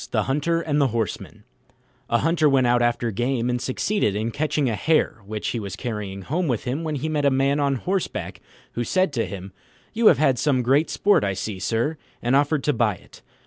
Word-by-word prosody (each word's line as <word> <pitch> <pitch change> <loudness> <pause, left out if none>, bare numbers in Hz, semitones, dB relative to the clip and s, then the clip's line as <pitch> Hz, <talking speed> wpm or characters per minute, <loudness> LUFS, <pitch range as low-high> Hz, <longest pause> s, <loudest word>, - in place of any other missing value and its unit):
THE - - +1
HUNTER 150 +5 0
AND 150 -3 0
THE 140 - +4
HORSEMAN 115 -4 -4 0.7
A 120 - +3
Hunter 155 +2 +2
went 135 -2 +3
out 120 0 +3
after 120 -1 +1
game, 120 +3 -1
and 125 0 -2
succeeded 130 - 0
in 110 +3 -2
catching 150 0 0
a 115 - 0
hare, 155 -4 +1
which 105 0 -3
he 120 - -2
was 100 -3 -5
carrying 105 -5 -5
home 170 - -1
with 120 -6 -1
him 135 +6 -3
when 155 -2 -2
he 145 +3 -3
met 150 -2 -1
a 140 - +5
man 135 +2 +1
on 140 -1 +1
horseback, 185 +8 -3 0.3
who 120 - -2
said 185 +4 +1
to 115 -6 -1
him, 95 0 -8 0.4
"You 230 0 +3
have 160 - +7
had 135 -3 +2
some 130 -5 +1 0.2
sport 205 - +2
I 100 -1 0
see, 95 0 -4
sir," 115 - -1 0.2
and 120 +3 +1
offered 145 0 +2
to 150 - +2
buy 110 -6 +1
it. - - -18
130 Hz, 215 wpm, -23 LUFS, 115-150 Hz, 0.7 s, have